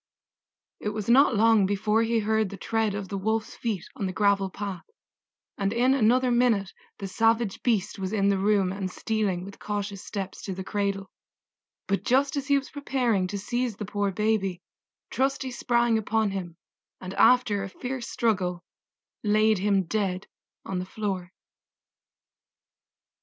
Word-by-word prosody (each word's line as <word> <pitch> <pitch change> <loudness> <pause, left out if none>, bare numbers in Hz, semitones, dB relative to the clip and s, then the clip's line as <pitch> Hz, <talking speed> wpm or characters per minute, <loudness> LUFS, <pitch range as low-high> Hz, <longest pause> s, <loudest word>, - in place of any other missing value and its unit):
It 210 - -2
was 210 -1 -4
not 255 0 +6
long 220 -2 +5
before 210 +2 +1
he 230 0 +1
heard 220 -1 +1
the 200 - -8
tread 220 +1 0
of 200 -2 -4
the 200 - -3
Wolf's 220 +2 -1
feet 215 -7 -3
on 195 - -2
the - - -2
gravel 200 0 +2
path, 195 -1 -5 0.8
and 195 0 +1
in 245 +3 +3
another 250 0 +3
minute 235 -5 +2 0.2
the 200 - -5
savage 225 +1 +1
beast 215 -4 0
was 190 0 -3
in 200 -2 +2
the 195 -1 +2
room 195 -2 +2
and 190 -1 -3
stealing 195 -3 -1
with 200 - -11
cautious 205 -1 -4
steps 195 -2 -5
to 190 - -4
the 190 - -5
cradle; 200 -1 -2 0.7
but 195 - 0
just 270 +3 +2
as 280 0 -3
he 280 -1 +4
was 275 - -5
preparing 250 -9 0
to 200 - -4
seize 240 +3 -2
the 210 - -5
poor 205 0 -1
baby 195 -2 0 0.5
Trusty 270 0 0
sprang 235 -2 +2
upon 220 -1 0
him 175 -4 -5 0.4
and 185 0 -7
after 245 -5 +4
a 195 - -4
fierce 250 +3 -5
struggle 180 -6 0 0.6
laid 215 0 +3
him 195 0 +2
dead 190 0 -2 0.4
on 190 -1 -3
the 180 - -4
floor. 190 -3 -4
210 Hz, 160 wpm, -26 LUFS, 195-230 Hz, 0.8 s, not